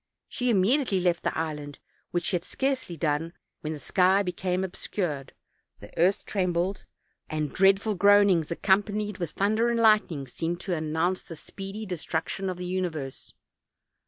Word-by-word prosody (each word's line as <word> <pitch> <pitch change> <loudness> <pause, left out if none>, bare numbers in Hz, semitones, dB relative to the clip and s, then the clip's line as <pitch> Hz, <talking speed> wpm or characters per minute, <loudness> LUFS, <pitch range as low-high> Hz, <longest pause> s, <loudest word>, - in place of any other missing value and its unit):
She 250 0 -1
immediately 220 +1 +3
left 175 -1 +1
the - - -2
island, 150 -3 -4 0.3
which 175 0 -2
she 190 - +1
had 170 - -1
scarcely 265 -8 -2
done 160 +2 -1 0.3
when 155 0 -4
the - - -5
sky 185 +8 +3
became 180 0 -1
obscured, 175 -6 -3 0.5
the 100 - -13
earth 185 +5 +2
trembled, 185 -1 -1 0.4
and 155 -2 -2
dreadful 195 +3 +4
groanings, 200 -4 +5
accompanied 205 +3 +1
with 170 -3 -2
thunder 215 +4 +2
and 235 -1 +1
lightning., 215 -10 +3
seemed 165 +7 -3
to 190 - -2
announce 160 +3 0
the 165 - -10
speedy 195 +6 -7
destruction 180 +1 -3
of 180 - -4
the 180 - -5
uni 185 0 0
verse. 140 -5 -8
180 Hz, 155 wpm, -27 LUFS, 165-200 Hz, 0.5 s, groanings